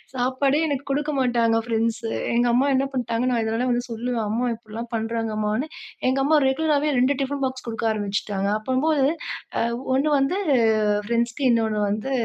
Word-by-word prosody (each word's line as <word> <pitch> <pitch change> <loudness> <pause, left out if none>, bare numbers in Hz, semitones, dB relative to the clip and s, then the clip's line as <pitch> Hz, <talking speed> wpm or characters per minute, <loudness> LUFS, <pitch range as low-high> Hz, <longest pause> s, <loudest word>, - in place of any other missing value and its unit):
சாப்பாடே 260 +3 +1
எனக்கு 280 -3 -1
குடுக்க 295 +2 0
மாட்டாங்க 235 -3 +2
ஃப்ரெண்ட்சு. 230 0 -1 0.3
எங்க 240 +1 +3
அம்மா 255 +3 +3
என்ன 270 +1 +2
பண்ணிட்டாங்கனா, 245 0 0
இதுலாம் 225 +3 -1
வந்து 240 0 0
சொல்லுவேன், 230 0 -2
"அம்மா 235 +4 0
இப்படிலாம் 225 +1 -8
பண்ணுறாங்கம்மானு." 225 +2 -1 0.4
எங்க 260 +1 +2
அம்மா 310 +3 +3
ரெகுலராகவே 300 +1 +1
2 260 +3 +3
டிஃபன் 275 +1 -2
பாக்ஸ் 260 -1 -3
குடுக்க 230 0 -3
ஆரம்பிச்சுட்டாங்க. 200 -1 -2
அப்பம்போது 265 +5 +1 0.7
அ - - -1 0.2
ஒண்ணு 275 +4 +2
வந்து 275 +8 +1 0.7
ஃப்ரெண்ட்ஸ்க்கு. 235 +4 -1
இன்னொன்னு 220 -2 +1
வந்து 215 +6 -2
245 Hz, 145 wpm, -23 LUFS, 225-270 Hz, 0.7 s, எங்க